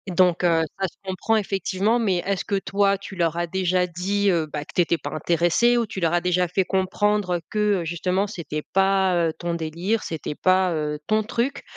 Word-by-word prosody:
Donc 180 Hz, -1 st, +3 dB
heu, 165 Hz, -1 st, +3 dB, 0.2 s
ça 190 Hz, -, +1 dB
se -, -, -15 dB
comprend, 190 Hz, +4 st, -1 dB
effectivement 200 Hz, +2 st, 0 dB
mais 195 Hz, -6 st, +1 dB
est-ce 195 Hz, -1 st, -1 dB
que, 200 Hz, -, -1 dB
toi, 200 Hz, 0 st, +1 dB
tu 195 Hz, 0 st, -10 dB
leur 165 Hz, -2 st, +1 dB
as 175 Hz, 0 st, 0 dB
déjà 180 Hz, 0 st, 0 dB
dit, 195 Hz, +4 st, 0 dB
heu, 165 Hz, -2 st, +1 dB
bah, 150 Hz, 0 st, -5 dB
que -, -, -14 dB
tu -, -, -2 dB
étais 170 Hz, 0 st, +1 dB
pas -, -, -6 dB
intéressée 175 Hz, +9 st, +2 dB
ou 235 Hz, -, +1 dB
tu 195 Hz, -, -6 dB
leur 165 Hz, -1 st, +1 dB
as 175 Hz, -, +2 dB
déjà 180 Hz, 0 st, +1 dB
fait 190 Hz, +3 st, +1 dB
comprendre 190 Hz, -1 st, 0 dB
que, 210 Hz, -3 st, +1 dB
heu, -, -, -5 dB
justement, 180 Hz, +4 st, 0 dB
c'était 165 Hz, -7 st, -5 dB
pas, 190 Hz, -1 st, +3 dB
heu, 165 Hz, -2 st, +1 dB
ton 170 Hz, -1 st, -3 dB
délire, 170 Hz, +7 st, -2 dB
c'était 160 Hz, -2 st, -4 dB
pas, 185 Hz, +1 st, +3 dB
heu, 150 Hz, -1 st, -2 dB
ton 215 Hz, 0 st, +2 dB
truc 240 Hz, +4 st, -2 dB
185 Hz, 215 wpm, -23 LUFS, 170-200 Hz, 0.2 s, Donc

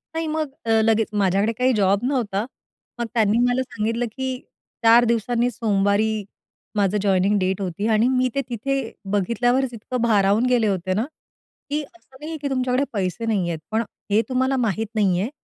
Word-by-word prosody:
नाही, 325 Hz, 0 st, -1 dB
मग 310 Hz, -1 st, -2 dB, 0.2 s
अ, -, -, -3 dB
लगेच 225 Hz, 0 st, +2 dB
माझ्याकडे 200 Hz, +1 st, +2 dB
काही 255 Hz, +1 st, +3 dB
जॉब 200 Hz, 0 st, +2 dB
नव्हता. 230 Hz, -6 st, -1 dB, 0.5 s
मग 235 Hz, -, 0 dB
त्यांनी 220 Hz, -1 st, +3 dB
मला 245 Hz, +1 st, +1 dB
सांगितलं 235 Hz, -1 st, -2 dB
की 260 Hz, 0 st, -3 dB, 0.5 s
4 230 Hz, +1 st, +7 dB
दिवसांनी 235 Hz, +1 st, +1 dB
सोमवारी 210 Hz, -1 st, +1 dB, 0.5 s
माझं 205 Hz, 0 st, +2 dB
जॉइनिंग 195 Hz, +1 st, +2 dB
डेट 190 Hz, +1 st, -1 dB
होती. 195 Hz, +3 st, -2 dB
आणि 220 Hz, +1 st, +3 dB
मी 255 Hz, 0 st, +2 dB
ते 275 Hz, -, +2 dB
तिथे 270 Hz, +4 st, -1 dB, 0.3 s
बघितल्यावर, 235 Hz, +6 st, +1 dB
इतकं 240 Hz, +2 st, -4 dB
भारावून 210 Hz, 0 st, +3 dB
गेले 245 Hz, -3 st, +3 dB
होते 185 Hz, -2 st, -1 dB
ना, 220 Hz, +5 st, 0 dB, 0.6 s
की 295 Hz, +1 st, 0 dB
असं 285 Hz, -2 st, -19 dB
नाही 305 Hz, +3 st, -7 dB
आहे 320 Hz, -, -4 dB
की 285 Hz, -, -2 dB
तुमच्याकडे 255 Hz, 0 st, +1 dB
पैसे 195 Hz, +3 st, -2 dB
नाही 200 Hz, -6 st, 0 dB
आहेत. 165 Hz, -, -3 dB
पण 220 Hz, +1 st, +1 dB, 0.3 s
हे 210 Hz, +2 st, +4 dB
तुम्हाला 260 Hz, +1 st, +1 dB
माहित 225 Hz, -3 st, 0 dB
नाही 195 Hz, -4 st, +2 dB
आहे, 215 Hz, -, -2 dB
225 Hz, 175 wpm, -22 LUFS, 200-250 Hz, 0.6 s, 4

